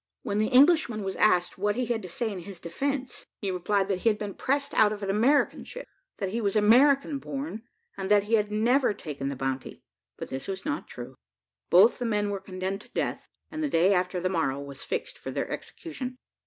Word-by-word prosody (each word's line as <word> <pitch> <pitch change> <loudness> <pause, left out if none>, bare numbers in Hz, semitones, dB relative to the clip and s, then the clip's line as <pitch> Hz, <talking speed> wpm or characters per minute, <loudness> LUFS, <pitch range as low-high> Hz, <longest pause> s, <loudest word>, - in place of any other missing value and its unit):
When 205 - -1
the 215 - +2
Englishman 265 -5 +4
was 190 -1 -3
asked 180 -3 +3
what 205 +1 +1
he 250 +1 0
had 230 -1 -1
to 185 - -8
say 225 +5 -2
in 195 - -5
his 185 0 -9
defence, 270 +10 -3
he 200 -3 -3
replied 195 +2 0
that 195 -2 -1
he 230 - +3
had 210 - 0
been 205 -2 -5
pressed 280 +1 -1
out 210 -1 +5
of 210 -1 -5
an 195 - 0
American 245 +9 +2
ship, - - -8 0.3
that 195 -3 -2
he 230 +4 -2
was 200 -1 0
American 275 +7 +5
born, 275 -5 -5 0.4
and 190 -1 -4
that 205 -1 +5
he 210 +3 -4
had 210 -2 +3
never 235 +2 +2
taken 140 -6 -5
the 140 - -4
bounty. 135 0 -4 0.3
But - - -6
this 130 +1 -5
was 190 -1 -5
not 145 - -2
true. 125 +1 -8 0.6
Both 195 +9 +6
the 245 - -2
men 210 -2 0
were 200 - -2
condemned 190 +1 -4
to - - -18
death, - - -3 0.2
and 310 0 -3
the 300 - 0
day 185 -2 +4
after 180 0 0
the 180 - 0
morrow 140 -7 0
was 140 -1 -8
fixed - - -4
for - - -6
their - - -2
execution. 260 -7 -6
205 Hz, 220 wpm, -27 LUFS, 185-245 Hz, 0.6 s, Both